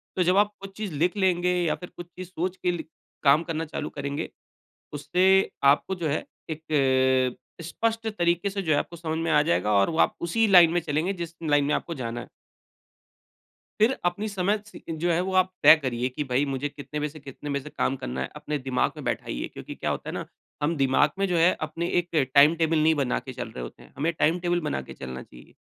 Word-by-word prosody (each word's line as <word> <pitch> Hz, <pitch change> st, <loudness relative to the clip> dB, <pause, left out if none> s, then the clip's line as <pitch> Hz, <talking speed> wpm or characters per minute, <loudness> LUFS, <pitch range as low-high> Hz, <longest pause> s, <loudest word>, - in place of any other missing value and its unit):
तो 185 Hz, -, +2 dB
जब 180 Hz, +3 st, +3 dB
आप 210 Hz, 0 st, +3 dB
कुछ 195 Hz, 0 st, -10 dB
चीज़ 210 Hz, -5 st, -4 dB
लिख 175 Hz, +4 st, +2 dB
लेंगे 180 Hz, -2 st, +2 dB
या 165 Hz, -, +1 dB
फिर 180 Hz, -, -10 dB
कुछ 175 Hz, -, -7 dB
चीज़ 180 Hz, +1 st, -9 dB
सोच 185 Hz, +1 st, -3 dB
लिख 175 Hz, -1 st, +2 dB
के -, -, -38 dB, 0.3 s
काम 145 Hz, +3 st, +5 dB
करना 165 Hz, -1 st, -3 dB
चालू 150 Hz, -1 st, -5 dB
करेंगे, 140 Hz, +2 st, -4 dB, 0.6 s
उससे 185 Hz, +6 st, +3 dB, 0.2 s
आपको 190 Hz, +5 st, -3 dB
जो 170 Hz, -3 st, -2 dB
है 150 Hz, -, -1 dB, 0.3 s
एक 130 Hz, -5 st, +2 dB, 0.2 s
अ, -, -, -8 dB
स्पष्ट 225 Hz, +6 st, -2 dB
तरीके 175 Hz, -2 st, +1 dB
से 195 Hz, 0 st, -3 dB
जो 160 Hz, -, -1 dB
है, -, -, +3 dB
आपको 170 Hz, -, -6 dB
समझ 160 Hz, -1 st, -3 dB
में 165 Hz, 0 st, -1 dB
आ 150 Hz, -1 st, +5 dB
जाएगा 95 Hz, -, +1 dB
और 100 Hz, -1 st, +4 dB
वो 160 Hz, -, -3 dB
आप -, -, +3 dB
उसी 215 Hz, +7 st, +2 dB
लाइन 175 Hz, -4 st, +7 dB
में 175 Hz, -, +2 dB
चलेंगे 160 Hz, +5 st, -1 dB
जिस 170 Hz, -3 st, -6 dB
लाइन 145 Hz, -2 st, +3 dB
में 150 Hz, -, +1 dB
आपको 170 Hz, -, -3 dB
जाना 115 Hz, +1 st, -4 dB
है। -, -, -10 dB, 1.5 s
फिर 230 Hz, +5 st, +4 dB
अपनी 180 Hz, +5 st, -1 dB
समय 200 Hz, +1 st, 0 dB
सी 210 Hz, -, -13 dB
जो 165 Hz, +2 st, -1 dB
है 165 Hz, -, +2 dB
वो 190 Hz, +1 st, -2 dB
आप 185 Hz, 0 st, +3 dB
तय -, -, +10 dB
करिए 125 Hz, -4 st, -2 dB
कि 145 Hz, +3 st, -4 dB
भई, 130 Hz, +2 st, +1 dB
मुझे 135 Hz, 0 st, -2 dB
कितने 145 Hz, +1 st, -7 dB
बजे 150 Hz, -, -1 dB
से, 155 Hz, +1 st, -12 dB
कितने 140 Hz, +1 st, -8 dB
बजे 140 Hz, 0 st, -1 dB
से 150 Hz, -, -10 dB
काम 135 Hz, -, +1 dB
करना 65 Hz, -, -5 dB
है, 65 Hz, -, -2 dB
अपने 150 Hz, 0 st, -3 dB
दिमाग 130 Hz, -1 st, 0 dB
में -, -, -8 dB
बैठाइए। -, -, -3 dB
क्योंकि -, -, -9 dB
क्या -, -, -3 dB
होता -, -, -4 dB
है -, -, -6 dB
ना, -, -, -4 dB, 0.4 s
हम 165 Hz, +3 st, +1 dB
दिमाग 135 Hz, +1 st, +3 dB
में 195 Hz, -, +2 dB
जो 180 Hz, -, +1 dB
है 170 Hz, +3 st, +5 dB
अपने 165 Hz, +3 st, -3 dB
एक 175 Hz, -, -1 dB, 0.3 s
टाइम 145 Hz, +3 st, +7 dB
टेबल 165 Hz, -1 st, +2 dB
नहीं 155 Hz, +1 st, +4 dB
बना 130 Hz, -3 st, 0 dB
के 130 Hz, -, -8 dB
चल 120 Hz, -2 st, -5 dB
रहे 65 Hz, -, -7 dB
होते -, -, -9 dB
हैं। -, -, -18 dB
हमें 160 Hz, +5 st, 0 dB
टाइम 165 Hz, +1 st, +2 dB
टेबल 175 Hz, 0 st, 0 dB
बना 145 Hz, -, -1 dB
के -, -, -10 dB
चलना 65 Hz, -1 st, -7 dB
चाहिए -, -, -16 dB
160 Hz, 235 wpm, -26 LUFS, 140-180 Hz, 1.5 s, तय